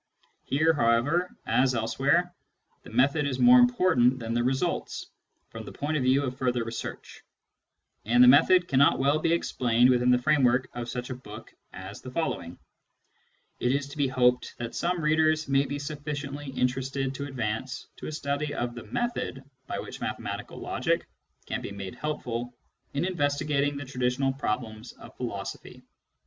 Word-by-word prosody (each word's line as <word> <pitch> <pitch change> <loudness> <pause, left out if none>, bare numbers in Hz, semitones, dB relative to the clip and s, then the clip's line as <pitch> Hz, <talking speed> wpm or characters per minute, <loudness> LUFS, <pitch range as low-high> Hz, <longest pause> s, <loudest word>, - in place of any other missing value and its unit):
Here, 160 +4 +3
however, 145 +8 +2 0.2
as 130 0 +2
elsewhere, 135 +10 +1 0.5
the - - -13
method 140 +6 +2
is 130 -3 -2
more 250 +1 +7
important 180 - +4
than 115 -2 -4
the 120 0 +1
results, 130 +2 -2 0.4
from - - -7
the - - -9
point 150 +2 -3
of 145 - +1
view 130 +2 +3
of 130 -2 -3
further 125 -2 0
research; 115 0 -7 0.8
and 120 +3 +5
the - - +8
method 175 +7 +6
cannot 140 0 +4
well 140 +3 +2
be 165 - +1
explained 125 -6 +3
within 125 0 +3
the 125 - +6
framework 125 -2 +3
of 120 -1 -5
such 125 0 -5
a - - -3
book 110 -2 -11 0.2
as 95 +3 -9
the 130 - -8
following. 110 - -3 1.0
It 125 +1 +1
is 140 0 -1
to 140 - -10
be 140 -2 +2
hoped 125 -1 +2
that 120 -1 -5
some 175 0 -1
readers 155 0 +2
may 135 0 +2
be 145 - -3
sufficiently 145 -1 -5
interested 135 +1 -1
to 140 +1 -5
advance 125 -1 -3
to - - -7
a - - -4
study 145 0 -2
of 120 0 -2
the 120 - -9
method 240 - -3 0.2
by - - -3
which - - -7
mathematical - - -5
logic - - -1 0.4
can - - -3
be - - -6
made 100 +1 -6
helpful 125 -4 -4 0.4
in 145 +5 0
investigating 145 -4 0
the 145 - -6
traditional 130 +1 0
problems 110 -4 -4
of - - -14
philosophy. - - -6
135 Hz, 165 wpm, -27 LUFS, 125-145 Hz, 1.0 s, the